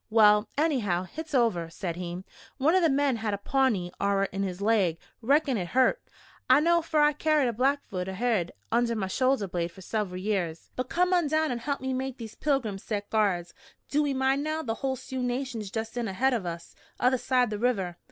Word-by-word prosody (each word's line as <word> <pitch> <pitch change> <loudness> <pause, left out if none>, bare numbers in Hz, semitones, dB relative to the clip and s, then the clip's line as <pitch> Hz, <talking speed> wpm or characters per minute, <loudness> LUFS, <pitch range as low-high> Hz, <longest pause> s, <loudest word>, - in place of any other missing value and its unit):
"Well, 210 -1 +5
anyhow, 240 - +1
hit's 310 - -6
over," 200 -10 +2
said 170 0 -4
he. 175 +1 -5 0.3
"One 290 +4 +3
of 375 - +4
the 330 - +4
men 275 -2 +2
had 220 -2 -1
a - - -6
Pawnee 210 -6 +1
arrer 200 0 +2
in 195 - -3
his 185 -2 -3
laig. 200 -6 +2 0.2
Reckon 275 +1 +2
hit 180 -3 -3
hurt. 260 - +2 0.5
I 260 +2 +7
know, 340 +2 +3
fer 315 -1 0
I 295 0 +5
carried 300 -2 +2
a 235 - -1
Blackfoot 250 -7 -1
arrerhead 190 -2 0 0.2
under 235 0 +2
my 205 -3 -1
shoulder 255 +2 +1
blade 175 -1 -2
fer 190 - -14
sever'l 185 -2 -3
years. 185 -5 -2
"But 255 0 -3
come 360 +1 +2
on 350 -4 +3
down 315 0 +1
and 240 -1 -3
help 280 +1 -2
me 260 0 -2
make 265 0 -3
these 225 -3 -8
pilgrims 255 -10 -1
set 205 -2 -4
guards. 190 -6 +1 0.4
Do 295 +1 +2
ee 275 - -1
mind, 265 +2 +1
now, 310 +1 -2
the 225 - -2
hull 265 -1 0
Sioux 260 +1 -6
nation's 245 -4 -3
just 225 +2 -4
in 240 -2 -2
ahead 255 +7 +1
o' 195 -7 -1
us, 170 0 -8 0.3
other 250 0 +3
side 250 -3 +1
the 210 - -3
river! 200 -8 0
235 Hz, 210 wpm, -28 LUFS, 195-275 Hz, 0.5 s, I